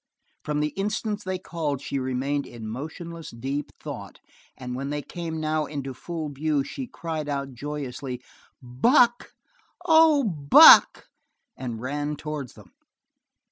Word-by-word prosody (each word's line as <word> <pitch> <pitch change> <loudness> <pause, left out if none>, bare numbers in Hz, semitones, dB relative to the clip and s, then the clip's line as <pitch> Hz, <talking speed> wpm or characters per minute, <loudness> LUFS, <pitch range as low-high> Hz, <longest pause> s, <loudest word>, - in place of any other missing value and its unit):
From 150 0 -1
the 150 - 0
instant 210 +3 -3
they 185 0 -2
called 160 -6 -3
she 140 0 -3
remained 135 +2 -2
in 115 -2 -9
motionless, 160 +7 -7
deep 135 +5 -4
thought, - - -8 0.4
and 125 -1 -6
when 135 +2 -4
they 145 0 -3
came 165 -2 -5
now 155 -1 -1
into 135 -3 -5
full 160 +3 -5
view, 145 0 0
she 255 - -6
cried 160 -7 -5
out 140 -1 -3
joyously: 135 -1 -5 0.4
"Buck, 235 - +3 0.5
oh 320 -4 +6
Buck!" 150 - +7 0.5
and 120 -4 -5
ran 145 +3 -3
towards 150 -4 -6
them. - - -16
145 Hz, 135 wpm, -25 LUFS, 135-170 Hz, 0.5 s, Buck